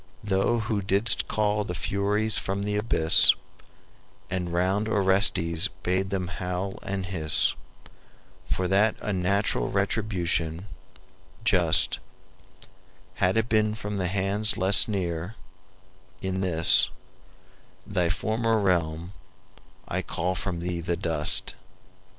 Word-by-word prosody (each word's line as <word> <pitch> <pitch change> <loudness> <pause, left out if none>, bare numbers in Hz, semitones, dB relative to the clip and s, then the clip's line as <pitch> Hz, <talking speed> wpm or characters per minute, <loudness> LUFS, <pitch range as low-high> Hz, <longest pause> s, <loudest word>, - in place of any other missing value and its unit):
Thou 100 +3 +1
who 110 -2 -2
didst 100 +4 +1
call 105 0 0
the 90 -3 -5
Furies 105 +4 -1
from 100 +1 -2
the 105 0 -2
abyss, 105 -7 +5 1.0
And 90 -2 -3
round 95 +5 0
Orestes 95 -5 +3 0.2
bade 95 +2 0
them 95 -2 -2
howl 90 +2 -4
and 95 -1 -4
hiss, 80 -5 +1 1.0
For 95 - -1
that 100 +4 +2
unnatural 100 +1 0
retribution, 95 -4 -1 0.8
just, - - +3 1.2
Had 95 +4 +2
it 115 - +3
but 115 - -15
been 110 -1 +1
from 105 -1 -5
hands 100 +3 0
less 95 +2 +3
near, 90 -1 -3 0.8
in 95 0 -3
this, 85 -3 +3 1.0
Thy 90 -4 0
former 110 +4 0
realm, 85 -3 -1 0.7
I - - -2
call 90 +2 -2
thee 90 - -3
from 90 -3 -3
the 85 -1 -3
dust!" 80 -3 0
95 Hz, 110 wpm, -26 LUFS, 90-105 Hz, 1.2 s, abyss